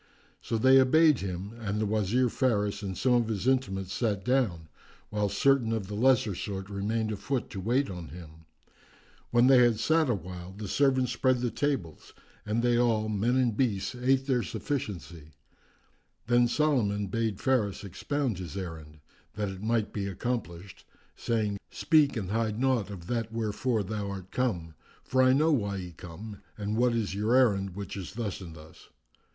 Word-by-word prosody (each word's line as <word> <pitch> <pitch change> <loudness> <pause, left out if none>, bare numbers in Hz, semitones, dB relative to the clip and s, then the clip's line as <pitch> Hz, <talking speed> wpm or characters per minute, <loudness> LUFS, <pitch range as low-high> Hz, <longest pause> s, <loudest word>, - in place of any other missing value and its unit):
So 115 - -2
they 130 +3 +6
obeyed 155 +2 +5
him 95 +2 -5
and 105 -2 -2
the 110 - +1
Wazir 110 +4 +1
Faris 105 -5 0
and 95 -3 -5
some 125 -1 +2
of 120 -2 +3
his 110 +1 -2
intimates 95 -8 0
sat 105 -5 -1
down, 115 -11 +1 0.4
whilst 105 -1 -1
certain 135 -5 +3
of 110 -3 -1
the 105 - -8
lesser 115 -1 +3
sort 95 +1 -5
remained 110 +3 -1
afoot 110 +4 -3
to 95 - -5
wait 125 +8 +1
on 90 -4 -7
him. 80 0 -12 0.8
When 120 0 +4
they 130 -1 +7
had 120 -3 +4
sat 160 -2 +2
awhile, 90 -3 -4
the 105 +1 -7
servants 130 +2 +2
spread 125 0 +1
the 120 -2 -1
tables 135 - -3 0.3
and 110 +3 0
they 120 -1 +3
all, 110 -3 +2
men 110 +4 +1
and 125 -4 +2
beasts, 110 -5 0
ate 130 +2 +1
their 130 -3 +1
sufficiency.[FN#363] 95 - -5 0.9
Then 120 +1 +4
Solomon 120 -8 +1
bade 110 0 -2
Faris 110 -8 0
expound 120 - -2
his 90 0 -6
errand, 80 -5 -7 0.3
that 105 -1 -2
it 95 0 -8
might 110 -1 0
be 100 -2 -2
accomplished, 95 -4 -4 0.3
saying, 105 -4 -1
"Speak 150 -5 +3
and 100 -3 -4
hide 110 0 -1
naught 125 -7 +1
of 95 -4 -8
that 115 +1 -2
wherefor 115 0 -1
thou 105 0 -4
art 95 -2 -7
come; 90 -11 -1 0.3
for 130 +1 +1
I 130 0 +5
know 155 +4 +3
why 100 -8 0
ye 90 -2 -6
come 95 +6 -10 0.2
and 105 0 -2
what 120 +1 +2
is 110 -4 -1
your 105 +5 +1
errand, 100 -8 +3
which 100 -1 -6
is 95 -4 -7
thus 105 -5 -4
and 85 -3 -9
thus. 80 0 -15
110 Hz, 175 wpm, -29 LUFS, 95-125 Hz, 0.9 s, they